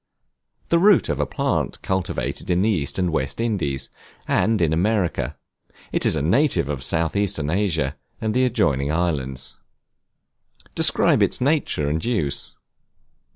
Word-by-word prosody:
The 170 Hz, -, +4 dB
root 200 Hz, 0 st, +5 dB
of 75 Hz, -1 st, -1 dB
a 75 Hz, -, 0 dB
plant -, -, -1 dB
cultivated 95 Hz, -1 st, -3 dB
in 90 Hz, +1 st, +2 dB
the 110 Hz, -, +2 dB
East 75 Hz, -9 st, -1 dB
and 90 Hz, -2 st, 0 dB
West 70 Hz, +2 st, -2 dB
Indies, 95 Hz, -, -1 dB, 0.4 s
and 110 Hz, -1 st, +2 dB
in 80 Hz, -2 st, +2 dB
America; 85 Hz, -, 0 dB, 0.5 s
it -, -, +1 dB
is -, -, +2 dB
a -, -, -1 dB
native 95 Hz, -, +2 dB
of 70 Hz, -3 st, -3 dB
South 80 Hz, +5 st, 0 dB
eastern 95 Hz, -7 st, 0 dB
Asia 80 Hz, -8 st, 0 dB, 0.2 s
and 110 Hz, -1 st, -1 dB
the 130 Hz, -, +2 dB
adjoining 75 Hz, -, +1 dB
islands. 70 Hz, -6 st, -2 dB, 1.2 s
Describe -, -, +3 dB
its -, -, +1 dB
nature 135 Hz, -, 0 dB
and 80 Hz, +3 st, -1 dB
use. 100 Hz, -, -2 dB
85 Hz, 145 wpm, -22 LUFS, 70-110 Hz, 1.2 s, root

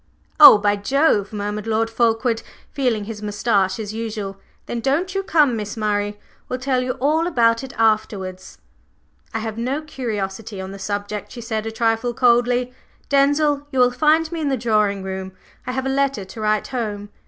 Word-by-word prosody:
"Oh, 295 Hz, -7 st, +11 dB
by 205 Hz, 0 st, +1 dB
Jove!" 215 Hz, -1 st, +2 dB
murmured 210 Hz, 0 st, -4 dB
Lord 225 Hz, 0 st, +1 dB
Fulkeward, 225 Hz, 0 st, +1 dB, 0.3 s
feeling 250 Hz, -7 st, 0 dB
his 210 Hz, 0 st, -7 dB
moustache 205 Hz, -2 st, 0 dB
as 215 Hz, -1 st, -5 dB
usual. 215 Hz, -3 st, -5 dB, 0.3 s
"Then 240 Hz, -, -4 dB
don't 295 Hz, +10 st, 0 dB
you 390 Hz, -, 0 dB
come, 300 Hz, -9 st, +3 dB
Miss 210 Hz, 0 st, -5 dB
Murray. 205 Hz, -1 st, -1 dB, 0.3 s
We'll 255 Hz, -, -2 dB
tell 255 Hz, 0 st, 0 dB
you 255 Hz, 0 st, -1 dB
all 310 Hz, +7 st, +1 dB
about 230 Hz, -7 st, +2 dB
it 265 Hz, -, -7 dB
afterwards." 205 Hz, -4 st, -1 dB, 0.7 s
"I 225 Hz, -, -2 dB
have 220 Hz, 0 st, -4 dB
no 265 Hz, +6 st, -2 dB
curiosity 215 Hz, -7 st, -5 dB
on 190 Hz, 0 st, -6 dB
the 195 Hz, -, -9 dB
subject," 205 Hz, +1 st, -4 dB
she 245 Hz, -, -8 dB
said 220 Hz, -1 st, -3 dB
a -, -, -3 dB
trifle 225 Hz, +1 st, 0 dB
coldly. 245 Hz, 0 st, +2 dB, 0.4 s
"Denzil, 290 Hz, +1 st, +2 dB
you 265 Hz, -, -5 dB
will 250 Hz, -1 st, +5 dB
find 315 Hz, +5 st, +2 dB
me 335 Hz, -1 st, -3 dB
in 295 Hz, -, 0 dB
the 265 Hz, -, 0 dB
drawing 210 Hz, -4 st, +1 dB
room. 190 Hz, 0 st, -5 dB, 0.3 s
I -, -, -1 dB
have 265 Hz, 0 st, -2 dB
a -, -, 0 dB
letter 275 Hz, -6 st, 0 dB
to 220 Hz, +4 st, -9 dB
write 215 Hz, 0 st, 0 dB
home." 210 Hz, -5 st, -4 dB
225 Hz, 180 wpm, -21 LUFS, 205-265 Hz, 0.7 s, Oh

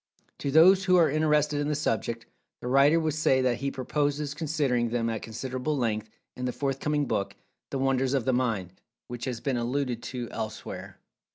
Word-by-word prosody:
To 140 Hz, -, -2 dB
those 185 Hz, +6 st, +6 dB
who 185 Hz, -1 st, +4 dB
are 165 Hz, -5 st, +5 dB
interested 150 Hz, -1 st, +2 dB
in 145 Hz, -, -1 dB
the 150 Hz, -, 0 dB
subject, 115 Hz, -4 st, -2 dB, 0.3 s
the -, -, -6 dB
writer 140 Hz, +5 st, +5 dB
would 160 Hz, -2 st, 0 dB
say 145 Hz, -3 st, +3 dB
that 125 Hz, -2 st, +1 dB
he 140 Hz, +1 st, -2 dB
purposes 145 Hz, +2 st, -1 dB
considering 140 Hz, -6 st, 0 dB
them 115 Hz, -1 st, 0 dB
at 110 Hz, -, -3 dB
considerable 130 Hz, +5 st, -3 dB
length, 110 Hz, -3 st, -1 dB, 0.3 s
in 125 Hz, -, -4 dB
the 125 Hz, -, 0 dB
forthcoming 145 Hz, +3 st, -1 dB
book 100 Hz, -6 st, -2 dB, 0.3 s
"The -, -, -3 dB
Wonders 135 Hz, 0 st, +1 dB
of 130 Hz, -, 0 dB
The 130 Hz, -, +2 dB
Mind," 110 Hz, -8 st, -1 dB, 0.4 s
which 120 Hz, -1 st, -5 dB
has 125 Hz, -3 st, -3 dB
been 135 Hz, -3 st, -1 dB
alluded 125 Hz, 0 st, -1 dB
to 125 Hz, -1 st, -5 dB
elsewhere. 110 Hz, -1 st, -6 dB
135 Hz, 185 wpm, -27 LUFS, 120-150 Hz, 0.4 s, those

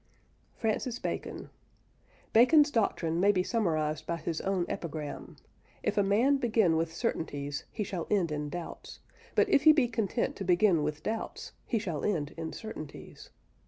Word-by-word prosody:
FRANCIS 230 Hz, +2 st, -1 dB
BACON. -, -, -5 dB, 0.8 s
Bacon's 290 Hz, +6 st, +6 dB
doctrine 170 Hz, -, 0 dB
may 200 Hz, +3 st, +5 dB
be 185 Hz, -2 st, +1 dB
summarised 155 Hz, -9 st, -1 dB
by 170 Hz, -, -1 dB
his 165 Hz, -1 st, -3 dB
own 190 Hz, -2 st, 0 dB
epigram, 155 Hz, -3 st, -5 dB, 0.5 s
"If -, -, 0 dB
a 205 Hz, -, +4 dB
man 225 Hz, +8 st, +3 dB
begin 220 Hz, -9 st, +2 dB
with 165 Hz, 0 st, 0 dB
certainties, 145 Hz, -3 st, -3 dB
he 215 Hz, -, -2 dB
shall 185 Hz, -4 st, -4 dB
end 185 Hz, -6 st, +2 dB
in 150 Hz, 0 st, -3 dB
doubts; 175 Hz, +2 st, -7 dB, 0.4 s
but -, -, +4 dB
if -, -, +4 dB
he 310 Hz, -, +10 dB
be 280 Hz, -5 st, +3 dB
content 230 Hz, -1 st, -1 dB
to 195 Hz, -, -4 dB
begin 180 Hz, -2 st, +4 dB
with 150 Hz, 0 st, -3 dB
doubts, 220 Hz, 0 st, -4 dB, 0.2 s
he 235 Hz, -, +1 dB
shall 175 Hz, -9 st, -3 dB
end 155 Hz, -8 st, -1 dB
in 165 Hz, -1 st, -5 dB
certainties." 185 Hz, -9 st, -9 dB
185 Hz, 160 wpm, -30 LUFS, 160-225 Hz, 0.8 s, he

